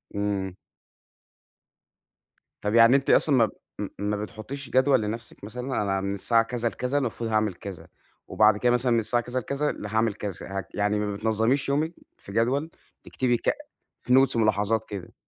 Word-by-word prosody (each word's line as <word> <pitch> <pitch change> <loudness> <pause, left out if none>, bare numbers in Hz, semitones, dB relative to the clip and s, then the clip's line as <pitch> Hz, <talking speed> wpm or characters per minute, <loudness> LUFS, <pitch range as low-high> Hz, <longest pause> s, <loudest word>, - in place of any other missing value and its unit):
إمم. 100 -2 -2 2.1
طب، 105 +1 -1
يعني 115 +3 +7
أنتِ 140 - +1
أصلًا 145 -4 +4
ما 115 -4 +4 0.5
ما 105 +1 -1
بتحطيش 120 +6 -7
جدول 130 -1 +4
لنفسك 115 +1 -6
مثلًا؟ 125 +3 -3
أنا 95 -1 0
من 100 0 -2
الساعة 115 +3 +2
كذا 120 0 -2
لكذا 125 +5 -2
المفروض 120 -3 -2
هاعمل 110 -3 +1
كذا، 95 -2 -9 0.4
وبعد 105 -1 +4
كده 120 +3 +2
مثلًا 125 +1 +2
من 115 - +4
الساعة 120 +2 0
كذا 125 +2 -2
لكذا 140 +4 -1
ل - - -8
هاعمل 110 0 +1
كذا. 100 -3 -6
ه - - -4
يعني 105 0 +1
ما 105 -1 -2
بتنظميش 110 +6 +1
يومك 155 +4 0 0.2
في 100 - -11
جدول، 130 +8 +1 0.3
تكتبي 120 -2 0
ك - - 0 0.5
في 125 - 0
notes، 130 - -6
ملاحظات 110 0 +1
كده؟ 100 -4 -7
115 Hz, 165 wpm, -26 LUFS, 105-125 Hz, 2.1 s, يعني